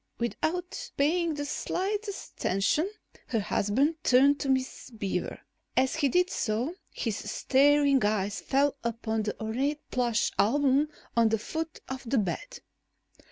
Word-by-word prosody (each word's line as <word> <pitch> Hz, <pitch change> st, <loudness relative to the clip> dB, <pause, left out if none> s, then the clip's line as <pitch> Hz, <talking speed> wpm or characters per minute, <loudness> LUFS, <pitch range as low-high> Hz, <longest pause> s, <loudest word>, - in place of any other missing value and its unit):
Without 355 Hz, -, -2 dB
paying 325 Hz, +3 st, +2 dB
the 290 Hz, 0 st, -3 dB
slightest 405 Hz, +6 st, -3 dB
attention, 195 Hz, -, +1 dB, 0.4 s
her 230 Hz, -, 0 dB
husband 270 Hz, +11 st, 0 dB
turned 275 Hz, +3 st, +5 dB
to 275 Hz, -, -2 dB
Miss 260 Hz, 0 st, -1 dB
Beaver. 210 Hz, -5 st, -3 dB, 0.4 s
As 260 Hz, +3 st, +2 dB
he 285 Hz, -3 st, +2 dB
did 360 Hz, +5 st, +2 dB
so, 235 Hz, +8 st, -1 dB, 0.2 s
his 225 Hz, -3 st, -2 dB
staring 280 Hz, -1 st, +4 dB
eyes 205 Hz, -1 st, 0 dB
fell 280 Hz, +1 st, +2 dB
upon 230 Hz, -1 st, -1 dB
the 210 Hz, 0 st, -4 dB
ornate 265 Hz, +7 st, -1 dB
plush 240 Hz, -3 st, +1 dB
album 280 Hz, +6 st, +3 dB, 0.3 s
on 230 Hz, -1 st, +5 dB
the 225 Hz, -, +2 dB
foot 320 Hz, +9 st, -5 dB
of 260 Hz, 0 st, -5 dB
the 270 Hz, -, +2 dB
bed. 215 Hz, -, -2 dB
265 Hz, 135 wpm, -28 LUFS, 225-305 Hz, 0.4 s, turned